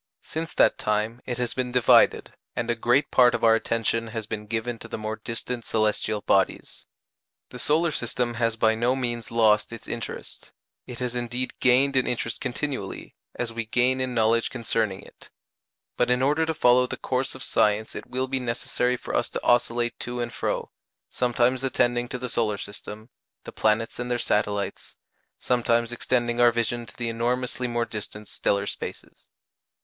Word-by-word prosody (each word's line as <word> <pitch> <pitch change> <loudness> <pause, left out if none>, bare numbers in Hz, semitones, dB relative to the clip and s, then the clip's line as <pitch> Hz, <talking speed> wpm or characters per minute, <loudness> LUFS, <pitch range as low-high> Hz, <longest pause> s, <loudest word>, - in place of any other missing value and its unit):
Since 160 0 -5
that - - +4
time 105 +3 -1
it 120 -2 -2
has 125 -2 -1
been 125 -1 -1
divided, 125 -1 +4 0.2
and 120 0 -1
a - - 0
great 120 +5 +2
part 125 -1 +5
of - - -4
our 115 -1 +7
attention 115 0 0
has 110 -1 -5
been 105 0 -5
given 115 +1 -2
to - - -9
the - - -5
more 110 0 -4
distant 115 +2 -4
celestial 110 -1 0
bodies. 95 -1 0 0.6
The - - -8
solar 160 +2 +2
system 120 -2 -1
has 115 -1 0
by 110 0 +3
no 120 +3 +1
means 120 -3 -3
lost 110 -2 +3
its 115 - -9
interest 120 -1 -6 0.4
it 125 - -7
has 125 -1 -3
indeed 120 +1 -1
gained 130 +2 +4
in 130 - +3
interest 115 -1 -2
continually, 130 -5 -4 0.2
as 120 -2 -3
we 115 -1 -3
gain 125 +3 +2
in 130 -1 -2
knowledge 115 0 +3
concerning 110 -5 -1
it; - - -17 0.7
but 125 - +2
in 125 +1 +2
order 150 +4 +2
to 160 - 0
follow 125 -1 +4
the - - -5
course 130 +1 -2
of 130 - -6
science 105 +1 +1
it - - -7
will 130 +1 -2
be 135 0 0
necessary 125 0 -1
for - - -5
us - - +1
to - - -5
oscillate 120 0 +2
to 120 0 -3
and 120 0 -3
fro, - - -2 0.4
sometimes 125 +1 +1
attending 120 -2 +1
to 125 - -4
the 125 0 -4
solar 110 -3 0
system 105 +3 -9 0.3
the - - -8
planets 110 +2 0
and 120 0 -3
their 120 - +1
satellites 105 -3 -2 0.4
sometimes 120 -1 +1
extending 120 0 0
our 120 0 +7
vision 120 0 -2
to - - -14
the 120 - -2
enormously 125 +2 -1
more 120 -1 -1
distant 105 -1 -7
stellar 100 0 0
spaces. - - -7
120 Hz, 180 wpm, -25 LUFS, 115-125 Hz, 0.7 s, our